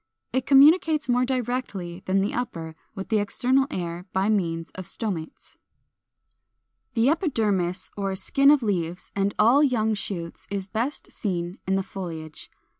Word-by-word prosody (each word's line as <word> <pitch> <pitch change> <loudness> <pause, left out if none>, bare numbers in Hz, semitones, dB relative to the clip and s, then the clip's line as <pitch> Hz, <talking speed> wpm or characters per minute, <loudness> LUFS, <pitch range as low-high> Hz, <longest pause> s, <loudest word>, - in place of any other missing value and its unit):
It 260 0 0
communicates 300 +2 +6
more 250 0 +3
directly 240 -8 -3
than 190 +1 +2
the 200 - -1
upper 165 -10 -4 0.2
with 195 -1 -6
the 220 -2 +3
external 260 +6 +2
air 175 - -4
by 190 +2 +1
means 165 -6 0
of 185 -2 -8
Stomates. 185 -8 -5 1.4
442. 225 - +2
=The 245 - +5
Epidermis= 205 - 0
or 195 -1 -2
skin 275 +8 +3
of 290 -3 +5
leaves 180 -4 -2
and 200 0 0
all 235 +7 +5
young 225 -6 +2
shoots 175 -5 -5
is 200 -1 -3
best 230 +8 -3
seen 180 -3 -3
in 190 - +2
the 195 - 0
foliage. 165 -5 -7
200 Hz, 150 wpm, -25 LUFS, 180-250 Hz, 1.4 s, communicates